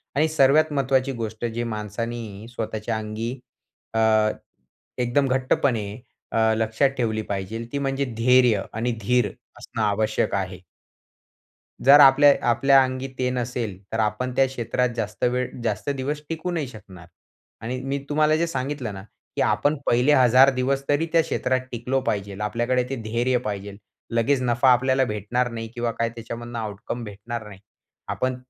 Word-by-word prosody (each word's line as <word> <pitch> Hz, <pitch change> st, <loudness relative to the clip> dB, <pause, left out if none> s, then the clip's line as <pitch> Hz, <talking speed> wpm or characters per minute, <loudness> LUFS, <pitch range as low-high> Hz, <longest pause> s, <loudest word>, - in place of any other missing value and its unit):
आणि 155 Hz, +3 st, +3 dB
सर्वात 155 Hz, +1 st, +4 dB
महत्वाची 135 Hz, -1 st, +1 dB
गोष्ट 115 Hz, -1 st, -4 dB
जी 120 Hz, +1 st, -2 dB
माणसाने 110 Hz, -1 st, -5 dB
स्वतःच्या 110 Hz, -1 st, -3 dB
अंगी 110 Hz, +2 st, -4 dB, 0.6 s
अ, 115 Hz, -, +1 dB, 1.0 s
एकदम 125 Hz, +3 st, +1 dB
घट्टपणे 130 Hz, -3 st, +1 dB, 0.5 s
अ, 110 Hz, 0 st, +3 dB
लक्षात 110 Hz, +5 st, +2 dB
ठेवली 110 Hz, -3 st, 0 dB
पाहिजे 100 Hz, +4 st, -3 dB
ती 140 Hz, -, -2 dB
म्हणजे 135 Hz, 0 st, -1 dB
धैर्य 120 Hz, -3 st, +4 dB
आणि 115 Hz, +3 st, -1 dB
धीर 125 Hz, 0 st, +2 dB, 0.3 s
असणं 115 Hz, -, -5 dB
आवश्यक 105 Hz, 0 st, 0 dB
आहे. 95 Hz, -2 st, -3 dB, 1.3 s
जर 145 Hz, +2 st, +9 dB
आपलेय 140 Hz, +1 st, +8 dB, 0.2 s
आपल्या 135 Hz, +3 st, +5 dB
अंगी 130 Hz, +1 st, -3 dB
ते 125 Hz, 0 st, 0 dB
नसेल, 120 Hz, -5 st, -3 dB
तर 115 Hz, -, -2 dB
आपण 110 Hz, +4 st, 0 dB
त्या 135 Hz, -, +5 dB
क्षेत्रात 125 Hz, 0 st, -1 dB
जास्त 105 Hz, -3 st, -4 dB
वेळ, 125 Hz, +1 st, +1 dB
जास्त 110 Hz, +3 st, -2 dB
दिवस 140 Hz, +2 st, -2 dB
टिकू 165 Hz, +2 st, -3 dB
नाही 160 Hz, -5 st, -2 dB
शकणार. 95 Hz, -7 st, -13 dB, 0.5 s
आणि 125 Hz, +3 st, -4 dB
मी 135 Hz, +1 st, -2 dB
तुम्हाला 155 Hz, +1 st, +3 dB
जे 170 Hz, +1 st, +1 dB
सांगितलं 135 Hz, -7 st, -3 dB
ना, 95 Hz, -, -8 dB, 0.3 s
की -, -, 0 dB
आपण 145 Hz, +2 st, +2 dB
पहिले 125 Hz, +5 st, +3 dB
1000 130 Hz, +1 st, +6 dB
दिवस 135 Hz, +2 st, 0 dB
तरी 145 Hz, +3 st, +2 dB
त्या 165 Hz, -1 st, +5 dB
क्षेत्रात 130 Hz, -4 st, 0 dB
टिकलो 125 Hz, +3 st, -1 dB
पाहिजे. 100 Hz, -1 st, -3 dB
आपल्याकडे 120 Hz, +4 st, 0 dB
ते 135 Hz, -, -2 dB
धैर्य 120 Hz, +3 st, +1 dB
पाहिजे. 100 Hz, -1 st, -5 dB, 0.4 s
लगेच 130 Hz, +3 st, +2 dB
नफा 125 Hz, +1 st, +3 dB
आपल्याला 130 Hz, +2 st, +3 dB
भेटणार 120 Hz, +4 st, -1 dB
नाही 115 Hz, -1 st, -5 dB
किंवा 120 Hz, -1 st, -1 dB
काय 115 Hz, 0 st, -1 dB
त्याच्यामधनं 115 Hz, 0 st, -7 dB
आउटकम 110 Hz, +3 st, -5 dB
भेटणार 110 Hz, +2 st, -7 dB
नाही. 100 Hz, -2 st, -12 dB, 0.5 s
आपण 130 Hz, 0 st, -1 dB
120 Hz, 150 wpm, -24 LUFS, 110-135 Hz, 1.3 s, जर